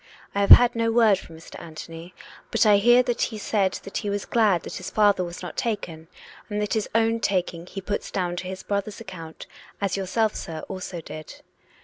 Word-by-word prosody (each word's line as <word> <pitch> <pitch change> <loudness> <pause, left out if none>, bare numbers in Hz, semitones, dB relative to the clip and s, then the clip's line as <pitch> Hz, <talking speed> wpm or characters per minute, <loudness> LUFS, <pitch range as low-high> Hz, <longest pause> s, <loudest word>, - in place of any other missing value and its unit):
I 200 - 0
have 200 - +1
had 245 -1 +9
no 230 0 +1
word 225 -4 +4
from 165 -3 -12
Mr. 165 - -11
Anthony, 165 +2 -10 0.3
but - - +2
I 210 -1 +6
hear 240 +4 +5
that 240 -1 -2
he 220 - -1
said 200 -2 0
that 195 - -5
he 205 - -2
was 200 0 -2
glad 210 -7 +2
that - - -6
his 185 - -6
father 205 -3 +3
was 175 +1 -7
not 180 - -7
taken, 170 -8 -3 0.4
and 210 0 -2
that 210 -1 -1
his 215 -2 -1
own 225 0 +3
taking 180 -4 -1
he 195 - -7
puts 205 +2 -3
down 180 -2 -2
to 180 - -4
his 190 0 -6
brother's 200 0 -3
account, 165 -4 -9 0.3
as 200 -2 -1
yourself, 210 +3 0
sir, 160 -2 -6
also 185 -2 -6
did. 155 -1 -10
200 Hz, 210 wpm, -25 LUFS, 175-215 Hz, 0.4 s, had